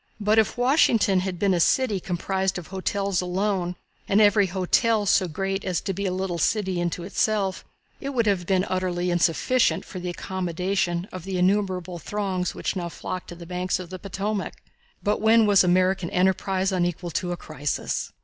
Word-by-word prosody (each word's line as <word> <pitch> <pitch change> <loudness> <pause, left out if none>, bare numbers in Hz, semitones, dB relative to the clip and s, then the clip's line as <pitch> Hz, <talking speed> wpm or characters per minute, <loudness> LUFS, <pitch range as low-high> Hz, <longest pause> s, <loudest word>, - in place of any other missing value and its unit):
But 210 +1 +3
if 220 - +1
Washington 240 - +3
had 185 -1 -3
been 195 +1 +2
a 175 - +1
city 215 +2 +2
composed 190 +2 -1
of 175 - -6
hotels 195 0 -1
alone, 180 0 -1 0.3
and 200 - +3
every 205 -1 +5
hotel 205 +4 +1
so 185 -1 +3
great 195 +4 -3
as 180 -3 -1
to 195 - -3
be 200 +2 -2
a - - -1
little 185 -2 -2
city 190 0 +1
in 175 -1 0
itself, 195 +2 -1 0.4
it 275 - -4
would 245 -5 0
have 190 -4 0
been 190 -1 +2
utterly 180 -1 -1
insufficient 175 +9 +2
for 185 - -7
the 180 0 -4
accommodation 180 0 -2
of 185 -2 -7
the 190 0 -3
innumerable 185 -2 0
throngs 190 -1 -2
which - - -2
now 175 -2 -3
flocked 185 +2 -6
to 175 - -8
the 170 0 -10
banks 180 +1 -1
of 180 -1 -8
the 185 - -6
Potomac. 200 +2 -3 0.5
But 210 +1 0
when 220 +1 +5
was 205 -2 +5
American 185 0 +2
enterprise 190 +1 +1
unequal 175 -1 -1
to 175 +2 -2
a 175 - -3
crisis? 150 -3 -3
185 Hz, 180 wpm, -25 LUFS, 180-200 Hz, 0.5 s, every